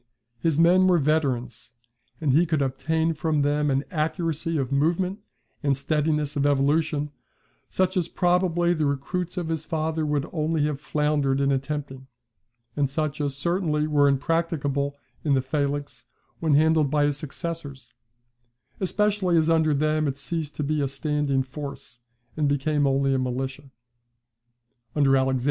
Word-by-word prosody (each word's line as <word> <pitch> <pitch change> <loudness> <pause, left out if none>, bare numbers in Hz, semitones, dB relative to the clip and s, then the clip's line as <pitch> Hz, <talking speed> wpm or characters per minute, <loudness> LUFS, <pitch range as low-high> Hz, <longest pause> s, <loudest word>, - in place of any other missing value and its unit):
His 155 +3 +1
men 180 +3 +5
were 180 -1 +5
veterans; 135 -7 -1 0.5
and 155 -5 +1
he 170 +5 +4
could 155 -3 +1
obtain 160 +5 0
from 155 -2 0
them 145 +1 +1
an 135 0 +1
accuracy 165 0 -1
of 135 -2 -2
movement 175 +7 +1 0.4
and 140 -3 +1
steadiness 150 0 0
of 140 - +1
evolution, 145 +1 +1 0.6
such 185 +1 0
as 175 -3 +1
probably 175 -1 +2
the 155 -3 0
recruits 175 +6 -3
of 175 -2 -2
his 160 -1 -2
father 160 0 -2
would 150 -1 0
only 155 -2 0
have 145 -2 -3
floundered 150 -3 0
in 140 0 +2
attempting, 135 -1 -3 0.7
and 145 -2 +1
such 150 +1 -2
as 140 -2 -2
certainly 160 -2 0
were 145 -2 +3
impracticable 140 -1 0 0.3
in 145 -3 +2
the 130 - +2
phalanx 140 +1 -3 0.3
when 160 -3 +2
handled 155 -1 +4
by 145 0 +2
his 145 -1 0
successors: 145 -3 -6 0.9
especially 200 -2 +1
as 160 0 +3
under 160 -1 +3
them 155 +1 +1
it 135 -1 -2
ceased 150 +2 -4
to 150 - -2
be 150 +1 0
a 140 - +1
standing 140 -1 -1
force, 140 -2 -8 0.4
and 150 -2 +1
became 145 +1 +1
only 135 0 +2
a 135 - +1
militia. 130 +2 -3 1.3
[See 150 - +1
Niebuhr. 135 -1 +3
150 Hz, 150 wpm, -25 LUFS, 140-160 Hz, 1.3 s, men